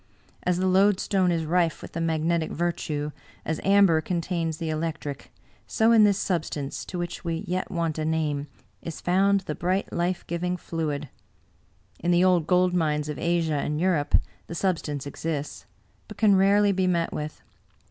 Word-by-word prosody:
As 180 -1 0
the 185 - 0
loadstone 190 0 +3
is 165 -2 0
rife 170 0 +1
with - - -8
the 165 - -4
magnetic 165 0 0
virtue, 155 -3 -2 0.3
as 160 -1 -2
amber 195 -5 +5
contains 170 -2 -2
the 160 -1 -3
electric, 155 -3 -4 0.4
so 225 0 +3
in 220 -2 +7
this 200 -2 +3
substance, 155 -7 -2
to 180 - -6
which 175 -1 -4
we 165 +3 -3
yet 185 +1 -2
want 165 -3 -2
a - - -1
name, 155 -2 -1 0.3
is 165 - -6
found 195 +2 +3
the 155 - -4
bright 185 +5 -1
life 175 +1 -1
giving 180 +2 -2
fluid. 150 -5 -3 0.9
In 170 - -2
the 175 +1 +4
old 180 -4 +3
gold 180 0 +3
mines 150 -3 0
of 150 - -4
Asia 170 -3 +1
and 150 +2 -2
Europe 170 -5 +1 0.3
the 170 - -6
substance 160 -6 -1
exists, 145 0 -4 0.4
but - - -10
can 210 -3 +5
rarely 200 +2 +4
be 190 -1 +1
met 170 -2 0
with. 150 0 -5
170 Hz, 170 wpm, -26 LUFS, 155-185 Hz, 0.9 s, in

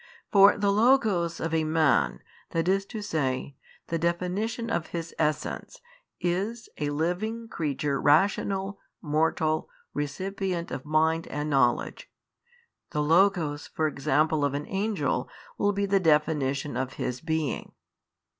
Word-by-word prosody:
For 200 0 +7
the 205 0 +1
λόγος 210 -7 +3
of 165 0 -2
a 160 -1 +2
man, 145 - +2 0.3
i. - - +1
e., - - +4 1.3
the 165 - -1
definition 180 +7 -1
of 170 -2 -1
his 165 -1 -5
essence, 155 -1 -2 0.4
is, 200 +7 -2
a 145 -1 0
living 180 +10 -2
creature 145 -5 -2
rational, 195 +5 +2 0.2
mortal, 155 0 0 0.2
recipient 180 +4 -3
of 130 - -5
mind 160 +2 +2
and 150 +1 -3
knowledge: 125 -4 +1 0.8
the 150 - -3
λόγος 165 -2 +2
for 160 - -1
example 150 +1 +1
of 140 -1 +1
an 145 +1 -3
angel 205 +2 -1 0.3
will 205 - +3
be 200 0 0
the 195 0 +3
definition 150 -4 +1
of 130 0 -2
his 125 0 -4
being. 160 -3 -2
165 Hz, 125 wpm, -27 LUFS, 150-195 Hz, 1.3 s, For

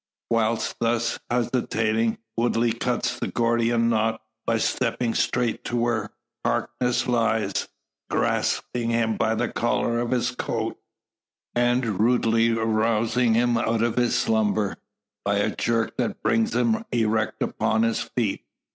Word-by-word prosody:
While 115 0 +2 0.2
thus 115 0 0
hesitating, 115 -2 0 0.2
Woodley 115 0 +1
cuts 120 0 -1
the - - -2
Gordian 115 0 +1
knot 110 0 +1 0.3
by 115 - +2
stepping 115 0 0
straight 120 -2 0
to 120 - -2
where 120 -1 0 0.3
Harkness 125 -1 0
lies, 115 -5 +1 0.4
grasping 120 -1 0
the 115 0 +1
collar 120 0 +1
of 120 0 -1
his 125 -2 +1
coat, - - -3 0.7
and 120 -4 +1
rudely 115 0 +3
arousing 115 +1 +1
him 120 0 +3
out 115 -1 +1
of 120 -1 0
his 120 -1 +2
slumber, 110 -2 +1 0.5
by - - +1
a - - 0
jerk 115 -1 0
that 120 -3 -2
brings 225 +1 +1
him 225 -1 +2
erect 110 -1 0
upon 110 0 0
his 115 -1 +1
feet. 110 -5 -2
115 Hz, 125 wpm, -24 LUFS, 110-120 Hz, 0.7 s, rudely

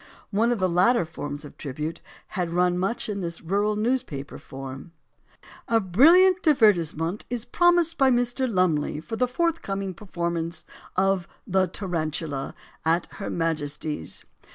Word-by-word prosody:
One 225 +4 +2
of 240 - +1
the 185 -2 +2
latter 180 +4 +3
forms 145 -2 -6
of 145 - -13
tribute 150 +4 -5 0.3
had 180 -4 -2
run 180 +1 +2
much 195 +6 -1
in 200 -2 -3
this 170 -1 -4
rural 205 +5 0
newspaper 215 - -2
form: 135 +4 -9 0.7
"A 230 -1 +3
brilliant 335 - +6
divertissement 195 - +3
is 240 -1 -2
promised 350 -1 +3
by 270 -1 +6
Mr. 245 +1 +1
Lum 180 -5 +3
ley 150 0 -3
for 195 +8 -6
the 250 +2 +1
forthcoming 240 - -1
performance 170 -3 -4 0.3
of 190 -1 +2 0.2
"The 190 0 +2
Tarantula,* 160 -6 -3 0.3
at 165 +2 +2
Her 200 - -4
Majesty's. 155 - -2
185 Hz, 140 wpm, -25 LUFS, 165-235 Hz, 0.7 s, brilliant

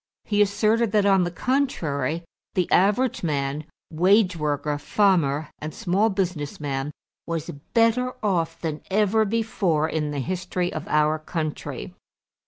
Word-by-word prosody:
He 205 -1 +2
asserted 215 +2 +2
that, 210 -2 +4
on 195 -2 +4
the - - -1
contrary, 170 - -1 0.3
the 180 -3 +2
average 210 +7 +3
man, 145 -2 -1 0.3
wage 185 +4 +4
worker, 150 -1 -1
farmer, 160 -5 +2
and 155 0 -6
small 195 +5 +2
business 180 -7 -2
man, 140 -1 -3 0.4
was 165 -2 -3 0.2
better 235 +2 +3
off 165 -5 0
than 155 -2 -3
ever 210 +2 +3
before 195 -8 0
in 155 -2 -1
the 145 - -4
history 180 +3 -2
of 155 - -5
our 150 +1 +2
country. 155 - -4
175 Hz, 135 wpm, -24 LUFS, 150-205 Hz, 0.4 s, that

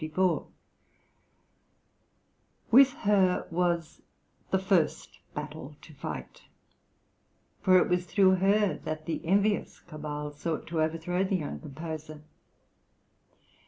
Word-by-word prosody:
With 265 +3 +8 0.2
her 190 -3 +3
was 170 -2 -1 0.5
"the 190 - +2
first 185 -5 0 0.2
battle 145 +3 -7
to 160 - -15
fight," 140 - -7 1.2
for 185 0 +6
it - - +4
was 180 0 0
through 190 -2 +4
her 200 +1 +2
that 155 0 -4
the 165 - -3
envious 200 +4 +1
cabal 150 -2 -6
sought 160 +2 -4
to 165 -1 0
overthrow 165 +3 0
the 195 0 0
young 155 -5 -3
composer. 155 0 -7
170 Hz, 100 wpm, -29 LUFS, 155-190 Hz, 1.2 s, With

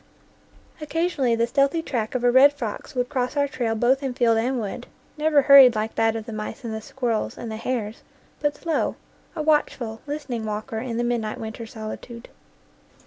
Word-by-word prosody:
Occasionally 305 -6 0
the 230 0 +2
stealthy 275 +6 +1
track 235 -6 -3
of 250 - -1
a 245 - +5
red 270 +3 +7
fox 250 0 -6
would 250 0 0
cross 255 +1 -2
our 285 0 +3
trail 240 -5 -2
both 250 +5 +2
in 265 -3 -3
field 230 -3 +3
and 250 +2 0
wood 220 +3 -5 0.3
never 300 -2 +3
hurried 270 -3 +9
like 215 +1 -2
that 225 0 +1
of 220 -1 -5
the 225 - -7
mice 215 +2 -6
and 230 -2 -4
the 220 - -4
squirrels 235 -1 -2
and 230 - -6
the 220 - -4
hares, 225 -2 -3 0.4
but 290 -1 0
slow 330 -2 -1 0.4
a 310 - -2
watchful, 260 -7 0
listening 285 -6 -4
walker 215 +1 -4
in 230 -1 -4
the 240 - 0
midnight 235 -3 -1
winter 225 +1 -6
solitude. 230 +2 -8
245 Hz, 190 wpm, -24 LUFS, 225-275 Hz, 0.4 s, hurried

